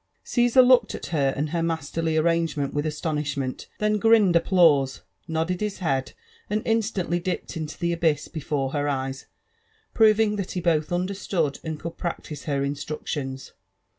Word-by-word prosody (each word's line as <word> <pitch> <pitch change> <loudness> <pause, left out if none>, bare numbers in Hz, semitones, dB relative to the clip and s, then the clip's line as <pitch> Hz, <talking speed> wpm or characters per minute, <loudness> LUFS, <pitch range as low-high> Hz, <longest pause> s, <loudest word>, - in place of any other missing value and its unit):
Caesar 245 +1 +4
looked 250 -3 +4
at - - -7
her 140 -3 +2
and 150 +1 -1
her 170 -1 0
masterly 165 0 -1
arrangemefit 160 -3 +1
with 145 +1 -1
astonish 150 -2 -2
moot, 130 -2 -4
then 210 0 +1
grinned 220 -4 +5
applause^ 165 -6 +4 0.3
nodded 165 +3 -1
his 210 -2 -2
head, 135 -7 -1 0.4
and 215 +1 -1
instantly 200 -6 0
dippei 185 0 -4
into 155 -2 -5
the 170 0 0
abyss 160 -4 +1
before 145 -3 -2
her 145 0 -1
eyes, 135 -1 -3 0.7
proving 215 -1 +4
that 195 -2 -4
he 180 - -2
both 160 -3 +1
understood 180 -4 -1
and 160 -2 -4
could 170 0 -7
practise 160 -4 -5
her 140 -2 0
instructions. 140 -1 -4
165 Hz, 155 wpm, -25 LUFS, 145-185 Hz, 0.7 s, grinned